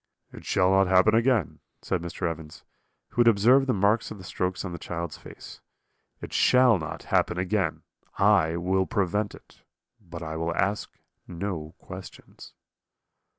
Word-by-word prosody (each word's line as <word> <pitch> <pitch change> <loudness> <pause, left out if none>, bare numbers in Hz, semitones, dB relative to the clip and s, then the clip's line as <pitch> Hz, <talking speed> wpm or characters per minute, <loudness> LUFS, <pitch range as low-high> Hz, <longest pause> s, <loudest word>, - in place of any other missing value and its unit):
"'It - - -11
shall 90 0 +2
not 95 0 +4
happen 95 +3 +4
again,' 115 - +1 0.2
said 90 - -1
Mr. 85 0 -4
Evans, 80 -2 -7 0.5
who 120 - +1
had 120 - +4
observed 120 +5 +5
the - - +2
marks 100 +3 +1
of 110 - -8
the 95 - -12
strokes 90 +1 -3
on 95 - -5
the 85 - -7
child's 85 -2 -5
face; - - -12 0.6
'it - - -8
shall 125 -5 +4
not 80 - -6
happen - - +2
again; 90 -1 -1 0.3
I 80 +1 +3
will 95 +2 0
prevent 105 0 -1
it; - - -20 0.4
but 85 -4 -9
I 80 0 -5
will 85 +1 -2
ask 100 +4 -1 0.4
no 85 -4 -5
questions.' - - -12
95 Hz, 155 wpm, -26 LUFS, 85-105 Hz, 0.6 s, observed